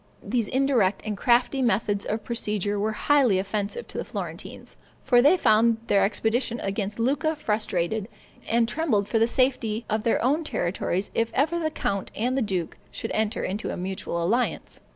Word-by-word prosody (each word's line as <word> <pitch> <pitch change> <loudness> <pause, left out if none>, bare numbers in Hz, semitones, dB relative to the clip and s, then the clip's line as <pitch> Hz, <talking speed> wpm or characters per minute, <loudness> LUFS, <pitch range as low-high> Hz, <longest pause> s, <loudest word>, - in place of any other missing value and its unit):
These 235 -4 -1
indirect 250 -7 +1
and 215 -1 -2
crafty 245 +5 +2
methods 205 -3 +1
of 215 +1 -2
procedure 210 -3 -1
were 215 +2 0
highly 265 -5 +3
offensive 205 - -3
to - - -5
the - - -2
Florentines, - - -7 0.3
for 245 -2 +5
they 295 +8 +5
found 225 -4 +4
their 200 -3 +3
expedition 230 +3 0
against 200 +1 -3
Lucca 290 +7 +1
frustrated, 210 - -1 0.4
and 230 0 +3
trembled 235 -10 0
for 225 - +1
the 225 - +4
safety 240 -3 0
of 215 0 0
their 230 - +2
own 295 +6 +2
territories 185 - -1
if 230 0 +1
ever 315 +6 +1
the 315 -2 0
count 200 -10 -2
and 245 +4 0
the 270 - +1
duke 185 -7 -2
should - - -5
enter 220 +1 -1
into 200 +3 -3
a - - -4
mutual 185 -2 -3
alliance. 235 +8 -1
225 Hz, 175 wpm, -25 LUFS, 205-255 Hz, 0.4 s, for